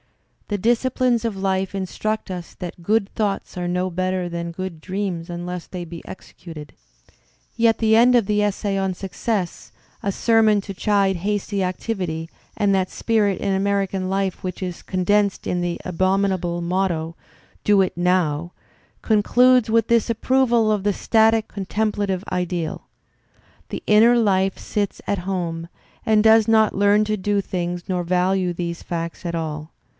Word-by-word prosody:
The 205 - -1
disciplines 240 +2 +1
of 225 -4 -2
life 190 0 -1
instruct 215 +3 -3
us 180 -2 -7
that 175 -1 -8
'"good 210 +2 +2
thoughts 205 -2 -2
are 175 -1 -3
no 180 +1 0
better 185 0 -1
than 170 0 -4
good 170 -2 -6
dreams 185 -3 -3
unless 175 0 -5
they 180 -2 -6
be 170 0 -9
executed." 160 -6 -10 0.8
Yet 230 -1 +3
the 220 -1 +3
end 245 +2 +6
of 235 -4 +4
the 210 +1 +1
essay 205 -1 -1
on 190 -1 0
"Success," 195 0 -3 0.3
a 200 - 0
sermon 220 0 +3
to 195 - -7
chide 195 -1 +1
hasty 200 +1 -1
activity 180 -4 -3 0.3
and 205 -2 +2
that 185 -1 0
spirit 210 -4 +1
in 200 -1 0
American 195 -1 0
life 195 -1 -1
which 185 0 -5
is 180 -2 -4
condensed 200 +2 0
in 180 - -1
the 175 -1 -2
abominable 185 -1 0
motto, 170 -2 -1 0.5
"Do 205 -1 +4
it 185 - 0
"now," 175 -2 +1 0.5
concludes 245 +3 +4
with 225 0 +3
this 235 -1 +2
approval 235 -1 +2
of 210 -2 +1
the 205 0 +2
static 220 +1 +3
contempla 205 +1 -2
tive 190 0 -2
ideal: 175 -2 -3 0.8
"The - - -5
inner 225 +3 +6
life 195 -4 +2
sits 205 -2 -3
at 200 -2 0
home, 170 -3 -3 0.4
and 215 -1 +4
does 220 -1 +6
not 220 -2 +4
learn 205 +1 +4
to 215 0 0
do 205 +1 0
things 175 -2 -3
nor 180 -2 -1
value 180 +1 +1
these 170 -1 -4
facts 170 +1 -5
at 170 -1 -2
all. 155 -1 -4
195 Hz, 155 wpm, -22 LUFS, 180-210 Hz, 0.8 s, end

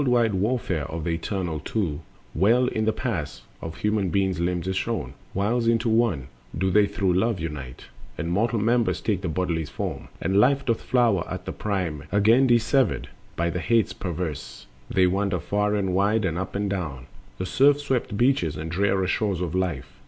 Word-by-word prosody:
20. 130 - +1
The - - +3
world 120 -1 +4
wide 95 - 0
warfare 100 - 0
of 80 0 -4
the 85 - -1
eternal 85 -1 -2
Two 80 -5 -2 0.3
Well 115 +9 +4
in 110 -3 -1
the 110 - +1
mass 85 - -3 0.2
of 80 0 -6
human 105 -4 0
limbs 90 -2 0
is 95 - -1
shown: - - -2 0.2
Whiles 115 +5 0
into 115 0 +2
one 110 - +1 0.3
do 95 0 +1
they 105 +2 +5
through 100 -2 0
Love 105 +2 +1
unite, 75 -6 -6 0.3
And 85 - -3
mortal 115 +6 +1
members 115 +2 +2
take 100 -4 -1
the 95 - -2
body's 80 -2 -1
form, - - -5
And 95 +3 +2
life 140 +5 +3
doth 115 -2 0
flower 120 -8 +2
at 90 0 -5
the - - -3
prime; 95 -8 -2
and 75 - -15
whiles, 100 - +2
Again 115 +6 +5
dissevered 120 -1 +2 0.3
by 85 +1 0
the 90 - -2
Hates 115 +3 +2
perverse, 85 -4 -5 0.2
They 95 - +3
wander 95 0 +1
far 105 +5 0
and 95 -3 0
wide 100 +3 +2
and 85 -3 -1
up 95 +3 -4
and 100 0 0
down 80 -10 -4 0.3
The 95 - -3
surf 140 +9 +4
swept 130 -7 -1
beaches 120 - +2
and 80 +1 -5
drear 95 +1 +1
shores 95 -1 0
of 90 -2 -3
life. 90 -8 -3
95 Hz, 195 wpm, -25 LUFS, 85-110 Hz, 0.3 s, they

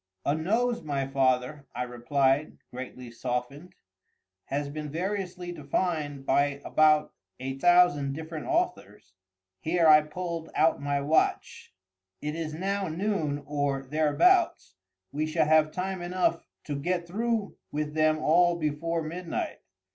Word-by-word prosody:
"A 140 - +2
nose, 225 +10 0
my 140 -3 -2
father;" 135 +1 0
I - - -1
replied, 135 +4 0
greatly 125 -1 -8
softened, 130 +8 -4 0.7
"has 145 +1 -2
been 150 +1 -6
variously 180 +1 -3
defined 150 -2 -2
by 140 +1 +2
about 155 -1 +3 0.3
a 135 +1 -5
thousand 175 -5 +4
different 160 +1 -6
authors." 340 - -2 0.5
[Here 165 0 +2
I 155 0 +8
pulled 165 +1 -5
out 160 -2 +3
my 140 0 0
watch.] 150 +3 0 0.5
"It 150 0 -3
is 160 -1 -4
now 195 +4 -2
noon 160 -4 -1
or 145 -2 -1
thereabouts—we 145 - +1
shall 155 0 +2
have 155 0 +4
time 185 +1 -3
enough 175 -1 0 0.2
to 145 - -4
get 175 +5 -1
through 220 +3 -2 0.2
with 150 0 -3
them 155 0 +3
all 175 +3 +4
before 165 +1 -1
midnight. 170 +2 -4
155 Hz, 125 wpm, -28 LUFS, 140-175 Hz, 0.7 s, I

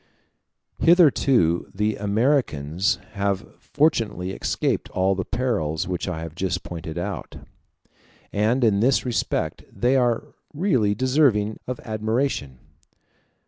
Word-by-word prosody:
Hitherto 135 - +4
the 105 +1 0
Americans 100 - +1 0.2
have 100 0 -1 0.2
fortunately 115 - 0
escaped - - -1
all 95 +1 +1
the 95 0 -2
perils 105 -13 -1
which 90 0 -3
I 85 -3 -3
have 80 -2 -7
just 90 +1 -2
pointed 80 -2 -7
out; - - -5 1.0
and 110 +5 +2
in 105 -4 +3
this 130 +5 +2
respect 120 -6 -2
they 125 +2 +1
are 125 +3 +1 0.2
really 130 - +2
deserving 130 -4 +2
of 125 -1 -4
admiration. 110 - -2
105 Hz, 110 wpm, -23 LUFS, 95-130 Hz, 1.0 s, Hitherto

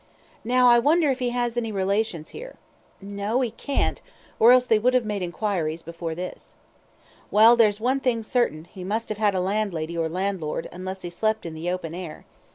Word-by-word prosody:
Now, 250 +2 +4
I 240 0 +7
wonder 300 +3 +3
if 265 - -3
he 250 -1 0
has 240 -1 -2
any 225 -2 -1
relations 195 -4 -1
here? - - -9 0.5
No, 200 +5 -2
he 245 -3 -1
can't, 275 +4 -2 0.4
or 230 +2 +7
else 250 0 +5
they 220 -3 +3
would 250 +3 +2
have 250 -3 +2
made 210 -2 -3
enquiries, 170 -3 -2
before 165 -1 -5
this. 180 +2 -8 0.7
Well, 220 +3 +7
there's 215 -3 +3
one 255 +4 +1
thing 240 -4 0
certain, 215 -10 0
he 180 +1 -10
must 220 +5 -3
have 215 -1 -4
had 205 -2 +2
a - - +1
landlady 180 -4 -2
or 165 -1 -1
landlord, 180 -3 -3
unless 185 +1 -7
he 175 - -5
slept 215 +4 -1
in 165 - -5
the 160 +2 -4
open 180 -3 -4
air. 175 -3 -8
205 Hz, 195 wpm, -24 LUFS, 180-240 Hz, 0.7 s, I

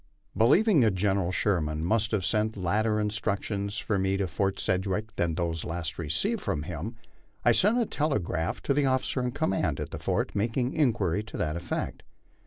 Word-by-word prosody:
Believing 165 - +5
that 110 -6 +3
General 95 -1 +1
Sherman 80 -5 0
must 110 +2 +2
have 105 -5 0
sent 105 +6 +1
later 105 +4 +1
instructions 100 -1 -2
for 105 -3 -1
me 95 0 +1
to 95 -1 0
Fort 95 +3 -1
Sedgwick 95 +4 -1
than 85 -2 0
those 85 -1 -1
last 85 -1 -4
received 80 -2 0
from 75 - -2
him, 85 +8 -5 0.5
I 120 - +7
sent 205 - +3
a 240 - +2
telegram 105 - -1
to 140 - +2
the 140 0 +2
officer 130 0 +1
in 125 - 0
command 90 - 0
at - - -5
the - - -5
fort, - - -1
making 120 +5 0
inquiry 110 - +1
to 110 - -8
that 75 -1 -1
effect. 85 0 -3
100 Hz, 180 wpm, -28 LUFS, 85-115 Hz, 0.5 s, I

